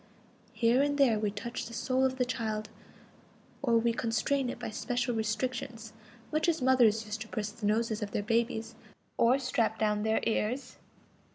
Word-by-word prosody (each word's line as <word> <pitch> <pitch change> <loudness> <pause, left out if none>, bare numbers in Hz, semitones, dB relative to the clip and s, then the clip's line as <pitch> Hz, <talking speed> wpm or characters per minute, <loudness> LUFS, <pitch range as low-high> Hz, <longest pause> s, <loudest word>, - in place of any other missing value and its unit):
Here 230 +3 +3
and 285 0 +1
there 245 -7 +4
we 210 -1 0
touch 210 +4 -5
the 230 - -8
soul 260 +2 +1
of 260 0 0
the 250 - +2
child, 220 -3 -3 0.9
or 235 -5 +3
we 230 0 +2
constrain 245 +4 0
it - - -5
by - - -5
special 245 +2 -1
restrictions, 225 0 -3 0.4
much 310 +3 +2
as 330 - +1
mothers 240 -4 +4
used 215 +1 -5
to 220 - -5
press 210 -1 -3
the 215 -1 -4
noses 220 0 0
of 210 - -2
their 205 - -2
babies 230 0 0 0.5
or 245 +3 +5
strap 230 -4 0
down 210 -1 +1
their 220 +1 +2
ears. 240 +4 -1
230 Hz, 175 wpm, -30 LUFS, 220-255 Hz, 0.9 s, or